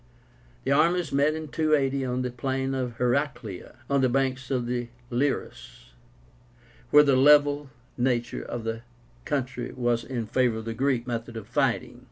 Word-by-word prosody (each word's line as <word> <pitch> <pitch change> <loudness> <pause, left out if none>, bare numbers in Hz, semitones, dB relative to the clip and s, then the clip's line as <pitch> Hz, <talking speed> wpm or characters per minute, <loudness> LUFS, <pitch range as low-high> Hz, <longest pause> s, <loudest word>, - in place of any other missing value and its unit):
The 135 - -1
armies 165 +3 +3
met 145 +3 +2
in 155 -1 -6
280 140 -4 +1
on 125 0 -1
the 125 - -2
plain 130 +2 -2
of 125 -3 -3
HERACLÉA, 120 -6 -2
on 140 -1 +2
the 130 - +3
banks 130 0 0
of 125 -3 0
the 120 0 -2 0.2
Liris, 120 - -3 1.0
where 150 0 +8
the 140 -2 +3
level 145 +1 +5 0.3
nature 120 -1 0
of 120 - -5
the 115 0 -3 0.4
country 130 -3 -2
was 120 -2 0
in 120 -4 -4
favor 120 0 +1
of 110 - -6
the 115 - -3
Greek 130 0 0
method 115 -1 -4
of 110 - -8
fighting. - - 0
130 Hz, 160 wpm, -26 LUFS, 120-140 Hz, 1.0 s, where